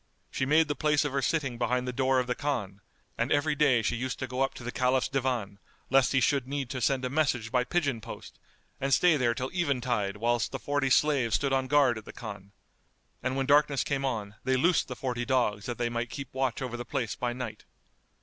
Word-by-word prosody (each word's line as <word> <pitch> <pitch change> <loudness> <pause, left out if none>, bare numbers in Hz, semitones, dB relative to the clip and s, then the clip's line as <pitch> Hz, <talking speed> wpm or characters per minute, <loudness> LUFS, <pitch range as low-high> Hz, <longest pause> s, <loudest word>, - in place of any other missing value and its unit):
She 130 - -1
made 155 +2 +4
the 145 - 0
place 150 +1 +1
of 145 - -1
her 140 0 0
sitting 135 -5 -1
behind 125 +1 0
the 125 - -2
door 130 +1 +2
of 125 - 0
the 125 - -1
Khan, 120 -9 -3 0.4
and 115 +3 0
every 145 +1 +2
day 140 -6 +3
she 115 - 0
used 125 +2 -3
to 130 - -3
go 130 +1 -4
up 135 - 0
to - - -9
the 120 - -4
Caliph's 130 +1 +1
Divan, 125 -7 -2 0.3
lest 135 -1 +4
he 135 - +3
should 135 0 +1
need 140 -2 -3
to 130 -2 -4
send 130 0 +1
a - - -1
message 130 -7 0
by 125 -1 +2
pigeon 140 -5 -1
post - - -10 0.4
and 135 0 +3
stay 180 -3 +4
there 125 -4 +1
till 130 +1 -3
eventide 125 - 0
whilst 120 +1 0
the - - -3
forty 145 -1 -1
slaves 135 -4 +3
stood 140 -1 0
on 130 -1 +1
guard 135 -5 +3
at 110 - -15
the - - -10
Khan; 100 -3 -8 0.7
and 130 +1 -1
when 135 0 0
darkness 145 -1 +4
came 140 -1 -2
on 110 -6 -2
they 130 0 +2
loosed 170 +6 +2
the 125 - -5
forty 125 -1 -3
dogs 115 -5 0
that 120 - -4
they 120 - 0
might 120 0 -3
keep 135 +1 -7
watch 130 -1 -1
over 125 -2 -4
the 120 - -4
place 120 -1 -2
by 125 -2 -2
night. 120 -4 -6
130 Hz, 235 wpm, -29 LUFS, 120-140 Hz, 0.7 s, made